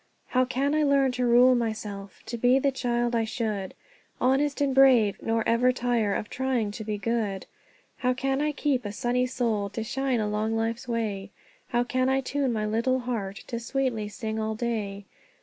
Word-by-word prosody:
"How 255 0 +3
can 270 +3 0
I 310 - +2
learn 280 -2 +3
to 250 0 0
rule 245 +2 +6
myself, 215 -4 -4
To 235 - -5
be 245 +3 +4
the 275 +1 +2
child 240 -2 0
I 230 - +2
should, 215 -4 -3 0.4
Honest 275 +3 +2
and 280 -2 +1
brave, 255 -6 +5
nor 225 -1 0
ever 240 +2 +4
tire 240 -5 0
Of 210 - -3
trying 250 -4 -1
to 220 - -6
be 210 -1 -3
good? 210 -3 -2 0.5
How 250 0 +1
can 270 +2 0
I 300 0 +1
keep 280 -3 0
a 205 - -4
sunny 245 +4 0
soul 225 -5 -1
To 225 - -4
shine 265 +1 -1
along 215 +1 -1
life's 225 +2 -2
way? 215 -5 -2 0.4
How 240 0 +1
can 255 +1 0
I 265 0 +2
tune 270 0 -1
my 215 -2 -1
little 235 +4 +1
heart 220 -6 -4
To 235 - -4
sweetly 235 -3 -1
sing 220 +1 -4
all 220 0 -2
day? 215 -4 -3
240 Hz, 185 wpm, -27 LUFS, 220-255 Hz, 0.5 s, rule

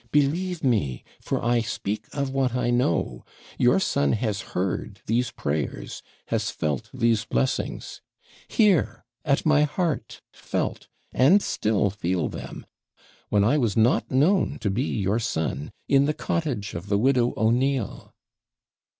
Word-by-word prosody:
Believe 165 +5 +1
me, 100 - 0 0.2
for - - -3
I 120 0 +3
speak 110 -1 -4
of 140 -2 -2
what 130 -2 0
I 125 -1 +1
know 120 -10 0 0.4
your 125 +10 +4
son 145 -8 +1
has 105 -3 -1 0.2
heard 95 +2 -2
these 120 +2 +1
prayers, 75 -1 -3 0.3
has - - 0
felt 75 -4 -3
these 115 -2 +1
blessings. 65 +2 -2 0.5
Here! 185 - +2 0.2
at 140 -2 +1
my 155 -1 +5
heart 150 +1 -1
felt, - - -3 0.3
and 145 +11 +6
still 105 - 0
feel 90 -3 -1
them, - - -8 0.6
when 105 -1 +3
I 135 +9 +3
was 115 -4 0
not 115 +3 +3
known 160 +9 +2
to 100 - 0
be 125 +8 0
your 105 -2 0
son, 80 - -2 0.2
in 140 0 +4
the 150 +1 0
cottage 130 -12 -2
of 85 +4 -6
the 100 0 +2
widow 125 +1 +2
O'Neill.' 125 +1 0
120 Hz, 140 wpm, -25 LUFS, 100-140 Hz, 0.6 s, and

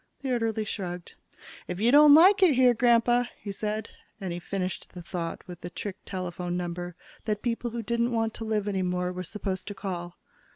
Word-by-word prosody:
The 265 - -1
orderly 225 -2 0
shrugged. 180 -5 -5 0.5
"If 180 +1 -4
you 230 +3 +4
don't 295 +1 +9
like 380 +6 +7
it 345 -7 +6
here, 250 -1 +6
Grandpa 240 +1 +4
" - - -31
he 205 - -4
said, 215 +2 -3 0.3
and 190 -4 -4
he 175 - -4
finished 185 +1 -4
the 175 - -8
thought 170 -1 -5
with 180 -2 -9
the 175 - -6
trick 195 +2 -6
telephone 180 -2 -4
number 175 0 -4 0.3
that 210 -2 -2
people 240 0 -1
who 230 0 -4
didn't 235 +2 0
want 225 -1 0
to - - -6
live 215 -2 -1
any 195 -2 0
more 180 0 -1
were 180 - -4
supposed 185 +1 -4
to 205 - -5
call. 180 -3 -5
205 Hz, 205 wpm, -27 LUFS, 180-235 Hz, 0.5 s, don't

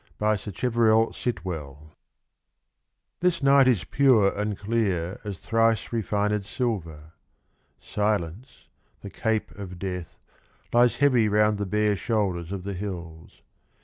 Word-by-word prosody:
44 110 0 +2
SACHEVERELL 110 +3 +1
SIT 115 -7 -4
WELL. 75 -6 -5
FOUNTAINS. 75 +1 -18 1.3
THIS 180 -4 +1
night 135 -1 +6
is 115 -9 +3
pure 125 -8 +3
and 105 -1 -2
clear 100 -5 -1
as 100 -4 -6
thrice 115 -1 +1
refined 105 -1 0
silver. 85 - -4 0.7
Silence, 105 +2 -3 0.3
the 100 - -8
cape 110 -2 -1
of 95 -3 -9
Death, 90 -2 -5 0.6
lies 120 0 +4
heavy 125 -4 +3
Round 105 0 +2
the 100 - -2
bare 105 +1 +1
shoulders 95 -6 -1
of 95 -2 -4
the 100 +1 -4
hills. 85 -4 -8
105 Hz, 125 wpm, -25 LUFS, 90-115 Hz, 1.3 s, night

